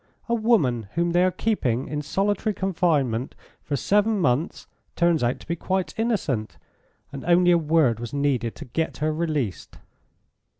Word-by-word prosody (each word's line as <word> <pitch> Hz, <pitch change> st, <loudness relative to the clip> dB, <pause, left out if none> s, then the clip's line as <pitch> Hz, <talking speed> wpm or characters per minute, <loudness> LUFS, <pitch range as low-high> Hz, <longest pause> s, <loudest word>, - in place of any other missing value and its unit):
A 235 Hz, -, 0 dB
woman 155 Hz, -, +2 dB
whom 170 Hz, 0 st, +1 dB
they 175 Hz, +1 st, +3 dB
are 185 Hz, -, +4 dB
keeping 135 Hz, -, -1 dB
in 150 Hz, +2 st, -3 dB
solitary 205 Hz, +6 st, -1 dB
confinement 155 Hz, -11 st, 0 dB, 0.3 s
for 145 Hz, -, -3 dB
seven 210 Hz, -, +2 dB
months 150 Hz, 0 st, 0 dB, 0.3 s
turns 170 Hz, -2 st, +2 dB
out 120 Hz, +2 st, 0 dB
to -, -, -14 dB
be 170 Hz, -, -1 dB
quite 185 Hz, +2 st, -2 dB
innocent, 150 Hz, -, -1 dB, 0.5 s
and 140 Hz, -2 st, -7 dB
only 175 Hz, +1 st, +4 dB
a 175 Hz, -, +5 dB
word 150 Hz, -7 st, +2 dB
was 120 Hz, -1 st, -6 dB
needed 135 Hz, -5 st, -1 dB
to -, -, -9 dB
get 160 Hz, +6 st, -3 dB
her 155 Hz, +1 st, 0 dB
released." 155 Hz, -, -3 dB
160 Hz, 160 wpm, -24 LUFS, 130-185 Hz, 0.5 s, a